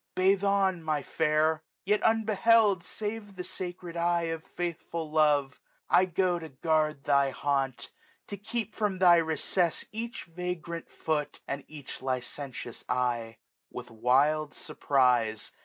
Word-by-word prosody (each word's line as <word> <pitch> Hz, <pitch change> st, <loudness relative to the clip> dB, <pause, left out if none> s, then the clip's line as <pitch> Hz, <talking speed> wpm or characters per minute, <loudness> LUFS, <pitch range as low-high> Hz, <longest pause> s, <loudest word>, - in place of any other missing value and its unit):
" -, -, -54 dB
Bathe 190 Hz, +1 st, +3 dB
on, 195 Hz, -3 st, +2 dB
my 155 Hz, -3 st, -1 dB
fair, 155 Hz, +1 st, +1 dB
" -, -, -60 dB
Yet 210 Hz, +2 st, +2 dB
unbeheld 220 Hz, -2 st, +4 dB
save 210 Hz, +4 st, -5 dB
by -, -, -16 dB
the 180 Hz, -1 st, -6 dB
sacred 180 Hz, -1 st, -6 dB
eye 170 Hz, 0 st, +1 dB
1350 -, -, 0 dB
Of 160 Hz, -1 st, -9 dB
faithful 170 Hz, -2 st, -4 dB
love: 145 Hz, -3 st, +2 dB, 0.3 s
I 185 Hz, -, +6 dB
go 180 Hz, 0 st, +1 dB
to 160 Hz, -1 st, -8 dB
guard 155 Hz, +1 st, 0 dB
thy 140 Hz, -1 st, +3 dB
haunt; 135 Hz, -1 st, -2 dB, 0.3 s
To 205 Hz, -, -6 dB
keep 220 Hz, +2 st, -4 dB
from 210 Hz, -3 st, -1 dB
thy 180 Hz, -2 st, +7 dB
recess 165 Hz, +1 st, 0 dB
each 230 Hz, +2 st, -5 dB
vagrant 170 Hz, -1 st, -5 dB
foot, 150 Hz, -2 st, -2 dB
*' -, -, -50 dB
And 140 Hz, 0 st, -4 dB
each 150 Hz, -3 st, -9 dB
licentious 130 Hz, -1 st, -4 dB
eye." 120 Hz, -3 st, -1 dB, 0.3 s
With 125 Hz, -1 st, -8 dB
wild 140 Hz, +7 st, +2 dB
furprize. 125 Hz, -8 st, +1 dB
160 Hz, 150 wpm, -29 LUFS, 140-185 Hz, 0.3 s, thy